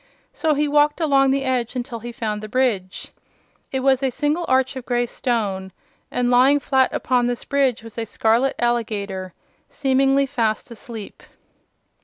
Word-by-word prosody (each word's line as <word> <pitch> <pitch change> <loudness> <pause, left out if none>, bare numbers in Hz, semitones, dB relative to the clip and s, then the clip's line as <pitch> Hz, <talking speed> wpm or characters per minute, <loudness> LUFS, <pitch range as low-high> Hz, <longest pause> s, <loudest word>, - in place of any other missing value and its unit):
So 310 -2 +1
he 295 +1 +1
walked 295 +1 +3
along 275 -4 +3
the 270 +1 +1
edge 255 -2 -1
until 245 -1 -4
he 240 +2 -7
found 215 -4 -3
the 215 - -7
bridge. 210 -7 -1 0.6
It 265 - -1
was 265 0 +3
a 270 - +1
single 300 +6 -1
arch 260 +1 +2
of 260 - -6
gray 245 0 0
stone, 205 -6 -2 0.4
and 245 0 0
lying 260 +4 +5
flat 265 -2 +2
upon 245 -1 +1
the 245 -1 -3
bridge 270 -5 +1
was 225 0 -8
a 225 - -2
scarlet 230 +5 +1
alligator, 205 -6 -2 0.3
seemingly 270 0 +2
fast 235 -5 -1
asleep. 225 -2 -9
250 Hz, 160 wpm, -22 LUFS, 225-270 Hz, 0.6 s, lying